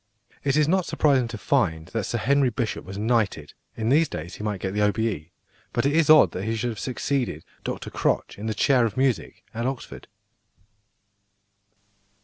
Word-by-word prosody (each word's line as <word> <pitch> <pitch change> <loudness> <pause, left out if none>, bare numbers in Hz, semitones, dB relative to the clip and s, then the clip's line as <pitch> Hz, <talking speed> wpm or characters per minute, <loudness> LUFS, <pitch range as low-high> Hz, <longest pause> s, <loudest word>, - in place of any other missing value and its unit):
It 140 0 +1
is 150 -1 +4
not 185 +1 +1
surprising 135 -5 +2
to 115 -1 -6
find 90 - 0
that 110 -4 -2
Sir 120 - -2
Henry 140 +3 +3
Bishop 120 -1 -3
was 95 +1 -8
knighted 105 -9 0 0.2
(in 110 0 -1
these 150 +4 +4
days 80 +3 -6
he - - -8
might 105 -2 -2
get 95 +1 -3
the 105 - 0
O.B.E.); 105 -6 0 0.4
but 120 - 0
it 140 - +2
is 165 -2 +3
odd 155 -1 +8
that 95 - -4
he 110 0 -1
should 120 +2 -1
have 110 - -7
succeeded 125 - -2 0.2
Dr - - -5
Crotch - - -1
in 110 - -4
the 110 - -2
chair 130 +4 +3
of 110 -1 -1
music 130 -4 -1
at 115 +2 -2
Oxford. 135 -2 -6
115 Hz, 185 wpm, -25 LUFS, 105-135 Hz, 0.4 s, odd